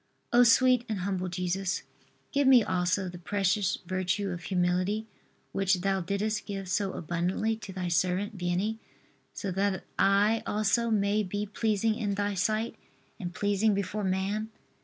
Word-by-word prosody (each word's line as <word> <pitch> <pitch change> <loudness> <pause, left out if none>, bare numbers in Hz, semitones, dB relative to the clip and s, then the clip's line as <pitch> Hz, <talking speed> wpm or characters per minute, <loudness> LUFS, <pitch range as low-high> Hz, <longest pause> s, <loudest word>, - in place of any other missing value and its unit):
O 240 - +7
sweet 250 +1 +5
and 210 -4 -2
humble 185 -1 -2
Jesus, 180 +1 -2 0.5
give 280 -1 +2
me 255 -3 +7
also 185 +1 0
the 175 0 -8
precious 195 +1 0
virtue 185 +2 -1
of 175 -1 -5
humility, 185 +3 0 0.5
which 190 -2 +1
Thou 195 0 +1
didst 210 +4 -2
give 195 -2 -4
so 195 +1 0
abundantly 175 +7 -1
to 210 -3 -9
Thy 185 -1 -3
servant 185 +5 0
Vianney, 185 +5 -1 0.6
so 195 - -3
that 195 0 0 0.2
I 205 +3 +4
also 215 +3 +1
may 205 -1 +2
be 205 +1 -3
pleasing 215 +1 0
in 210 -3 -2
Thy 205 0 -1
sight 215 +4 -1 0.4
and 175 -4 -4
pleasing 205 +3 +1
before 200 +1 -2
man. 195 +3 -1
200 Hz, 150 wpm, -29 LUFS, 185-215 Hz, 0.6 s, O